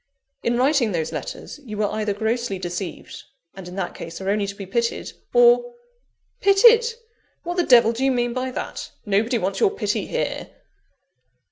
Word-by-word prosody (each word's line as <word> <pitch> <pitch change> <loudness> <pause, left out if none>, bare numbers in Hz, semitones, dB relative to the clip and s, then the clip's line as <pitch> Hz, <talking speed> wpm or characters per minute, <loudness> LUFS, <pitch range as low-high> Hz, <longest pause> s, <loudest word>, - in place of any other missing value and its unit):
"In 240 0 0
writing 255 -4 +2
those 160 -2 -2
letters, - - -7
you 215 -5 -7
were 210 - +1
either 215 -1 -1
grossly 220 -1 -1
deceived; 175 -1 -6 0.3
and, 190 -2 -10
in 180 - -9
that 190 -3 -3
case, 165 0 -8
are 195 +1 -1
only 205 -1 0
to 200 - -6
be 200 -1 -7
pitied, 235 +4 -2 0.2
or 485 0 +4 0.3
" - - -48
"Pitied! 450 +3 +7 0.6
what 350 +1 -3
the - - +4
devil 235 -6 +6
do 235 +3 -3
you 270 - +3
mean 240 -1 0
by 255 +1 -2
that? 255 - -5 0.2
Nobody 220 +4 +1
wants 195 -2 -2
your 435 - +4
pity 410 - -2
here." - - -3
235 Hz, 175 wpm, -23 LUFS, 200-270 Hz, 0.6 s, Pitied